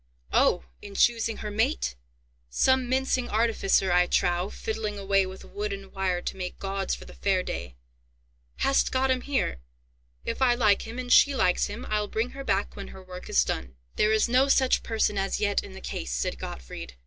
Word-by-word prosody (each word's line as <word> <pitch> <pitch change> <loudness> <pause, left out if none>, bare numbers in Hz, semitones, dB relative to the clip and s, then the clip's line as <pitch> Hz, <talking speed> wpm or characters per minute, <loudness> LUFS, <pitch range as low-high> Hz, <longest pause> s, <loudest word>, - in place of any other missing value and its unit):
"Oh! - - +4 0.2
in 200 -1 -10
choosing 230 -1 +2
her 210 - -3
mate! 60 - 0 0.5
Some 260 - +2
mincing 260 -1 +1
artificer, 210 -4 +2
I 180 0 +4
trow, 175 +2 +1
fiddling 215 -1 -4
away 195 -1 +2
with 190 0 -10
wood 205 +1 -4
and 195 -1 -7
wire 185 -2 -1
to - - -3
make 180 -1 -5
gauds 195 -1 -2
for - - -12
the - - -12
fair 190 -2 +1
day! 65 - -5 0.8
Hast 275 - +2
got 260 0 +2
him 255 -1 +1
here? 265 - -1 0.7
If - - -3
I 245 -2 +5
like 215 -3 +3
him, 230 +2 -7
and 250 -1 +1
she 280 -1 +6
likes 180 -7 +2
him, 210 +5 -7
I'll 210 -1 0
bring 225 +4 -2
her 275 0 -7
back 200 -5 0
when 200 - -7
her 190 - -11
work 180 0 -9
is 60 -1 +4
done." 65 0 -4 0.2
"There 210 - +3
is 220 +2 +3
no 255 +3 +4
such 265 -2 +3
person 220 -3 0
as 195 0 -1
yet 205 -1 +1
in 195 - -10
the 190 - -10
case," 65 - -5
said - - -2
Gottfried. 60 0 -7
205 Hz, 195 wpm, -27 LUFS, 185-240 Hz, 0.8 s, she